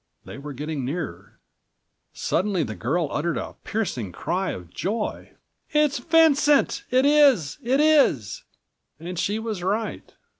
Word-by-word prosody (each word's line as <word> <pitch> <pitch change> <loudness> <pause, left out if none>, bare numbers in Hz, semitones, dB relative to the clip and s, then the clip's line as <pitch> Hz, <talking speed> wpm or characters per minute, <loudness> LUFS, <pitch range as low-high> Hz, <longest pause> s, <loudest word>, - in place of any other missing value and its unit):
They - - -9
were 145 +1 -7
getting 150 +1 -4
nearer. 115 - -5 0.7
Suddenly 190 -3 0
the 110 -5 -5
girl 155 - -1
uttered 165 +3 -1
a - - -5
piercing 130 - -3
cry 185 - -2
of 90 -2 -7
joy: 210 +4 -3 0.4
"It 300 -1 +4
is 275 - -4
Vincent! 295 -1 +3
It 255 +2 +3
is! 280 - +4
It 255 +4 +1
is!" 280 - +3 0.6
And 175 +1 -6
she 205 +2 0
was 220 -4 -4
right. 210 +5 -3
185 Hz, 140 wpm, -24 LUFS, -, 0.7 s, It